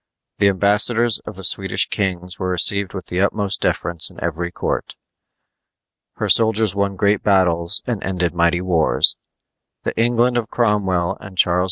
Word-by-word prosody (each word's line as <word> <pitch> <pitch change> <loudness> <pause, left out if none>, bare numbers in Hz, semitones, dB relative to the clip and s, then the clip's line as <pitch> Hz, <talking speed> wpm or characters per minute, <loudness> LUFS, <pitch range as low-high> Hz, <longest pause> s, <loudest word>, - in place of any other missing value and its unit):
The 100 - +4
ambassadors 105 +4 +3
of - - -7
the 95 - -7
Swedish 95 +1 +2
kings 90 -3 -4
were 95 - -3
received 100 +2 +2
with 95 - -7
the 90 - -4
utmost 100 -1 0
deference 85 -2 +1
in - - -19
every 85 +1 -3
court. - - -4 1.2
Her - - -3
soldiers 110 -2 +2
won 100 0 -2
great 100 +2 +1
battles 85 -4 +1
and 120 -5 -4
ended 90 -3 -2
mighty 85 0 +1
wars. 85 -4 +2 0.7
The - - -4
England 120 +1 +1
of 115 -2 -3
Cromwell 100 -7 -1
and 95 -1 -12
Charles 90 0 +3
II. - - +1
95 Hz, 160 wpm, -19 LUFS, 90-105 Hz, 1.2 s, The